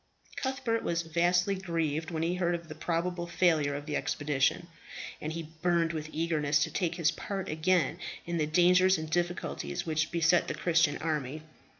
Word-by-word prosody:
Cuthbert 260 -4 -1
was 170 0 -1
vastly 175 +4 +2
grieved 165 -4 -2
when 160 -2 -2
he 170 +2 +1
heard 175 -1 +1
of 170 -1 -7
the - - -5
probable 170 +2 -2
failure 165 -4 +2
of 145 0 -6
the 150 - -3
expedition, 145 +3 0 0.6
and 155 - -3
he 160 -1 -6
burned 170 -2 +2
with 155 -1 -4
eagerness 150 -3 +1
to 160 - -3
take 175 -3 -1
his 165 -3 +2
part 195 +3 -5
again 170 +2 +1 0.3
in 170 0 -2
the 155 - +1
dangers 180 +3 +5
and 160 0 -6
difficulties 175 +1 -2
which 155 -1 0
beset 170 +1 +3
the - - -3
Christian 165 -3 +2
army. 155 -2 -3
165 Hz, 175 wpm, -30 LUFS, 155-175 Hz, 0.6 s, dangers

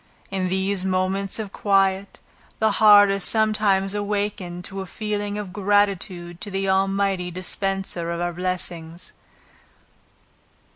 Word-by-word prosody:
In 185 -1 -1
those 190 0 0
moments 190 +1 -1
of 215 -3 -5
quiet, 195 -1 +1 0.4
the 220 0 +2
heart 205 -1 +7
is 195 0 -1
sometimes 210 -3 +2
awakened 205 -4 -3
to 195 0 -6
a 190 - -7
feeling 205 0 -3
of 200 -3 -6
gratitude 195 -4 0
to 210 - -4
the 195 0 -2
Almighty 195 -1 +1
dispenser 185 -1 -2
of 170 0 -3
our 175 0 -2
blessings. 175 -2 -3
195 Hz, 125 wpm, -23 LUFS, 185-205 Hz, 0.4 s, heart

